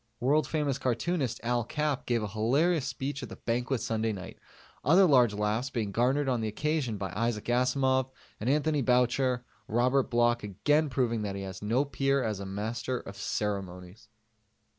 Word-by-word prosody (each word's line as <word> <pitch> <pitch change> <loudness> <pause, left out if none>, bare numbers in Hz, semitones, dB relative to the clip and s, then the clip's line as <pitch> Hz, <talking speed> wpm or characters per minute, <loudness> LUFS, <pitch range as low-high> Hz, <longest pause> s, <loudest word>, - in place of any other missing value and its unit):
World 140 +3 +2
famous 150 -4 -1
cartoonist 130 0 -1
Al 120 0 +1
Capp 150 +3 -2
gave 120 -3 +1
a - - -2
hilarious 135 - +1
speech 140 +1 -4
at - - -7
the - - -8
Banquet 120 +2 -1
Sunday 110 0 -1
night, 95 -3 -8 0.4
other 175 +8 +6
large 125 - +4
laughs 105 +5 -1
being 110 -6 -2
garnered 130 +6 +1
on 125 -3 +1
the 110 - -1
occasion 130 0 -1
by 95 -3 -4
Isaac 115 0 -1
Asimov 130 +1 +2 0.3
and 110 - -1
Anthony 150 +1 +2
Boucher, 125 0 +2 0.2
Robert 125 +4 +2
Bloch 120 0 +2
again 145 - +1
proving 120 -4 0
that 100 -2 -3
he 100 - -5
has 95 -1 -7
no 115 +7 +1
peer 135 0 +1
as 105 -3 -2
a 100 - -6
Master 110 +5 -3
of 100 - -10
Ceremonies. 100 0 -4
120 Hz, 170 wpm, -29 LUFS, 110-135 Hz, 0.4 s, other